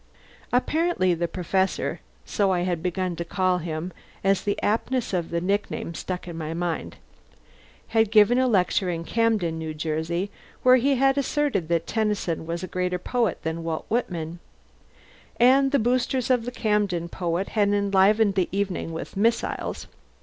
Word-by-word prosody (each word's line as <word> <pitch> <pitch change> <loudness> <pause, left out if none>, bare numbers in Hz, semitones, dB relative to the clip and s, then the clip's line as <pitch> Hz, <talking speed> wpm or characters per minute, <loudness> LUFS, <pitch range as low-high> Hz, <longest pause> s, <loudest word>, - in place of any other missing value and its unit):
Apparently 260 - +2
the 170 0 -1
Professor 190 +2 -1 0.3
(so 200 -3 +1
I 180 -1 +1
had 175 -2 -1
begun 180 0 -2
to 170 - -2
call 185 +1 +1
him, 165 +1 -4 0.3
as 195 0 +3
the 205 - -1
aptness 230 +2 0
of 175 -3 -1
the 170 - -1
nickname 195 -1 -2
stuck 180 +2 -5
in 170 - -6
my 160 0 -4
mind) 170 -1 -3 0.9
had 225 -1 +3
given 220 +3 +5
a 260 - +3
lecture 190 -3 +2
in 165 -1 -3
Camden, 205 -6 0
N.J., 160 +4 -2 0.3
where 255 0 +7
he 275 +3 +2
had 270 +2 +3
asserted 280 - 0
that 170 -1 0
Tennyson 210 -7 -1
was 170 +1 -3
a - - -3
greater 180 0 -1
poet 230 +2 -1
than 160 +1 -3
Walt 165 -1 -3
Whitman; 175 -8 -2 1.0
and 265 +3 +5
the 285 - +4
boosters 250 +1 +1
of 245 -3 +2
the 245 - -3
Camden 210 -7 0
poet 175 +2 -2
had 205 -2 +2
enlivened 200 +1 +3
the 190 -2 0
evening 195 -4 -2
with 160 - -6
missiles. 230 +4 0
190 Hz, 155 wpm, -25 LUFS, 170-225 Hz, 1.0 s, where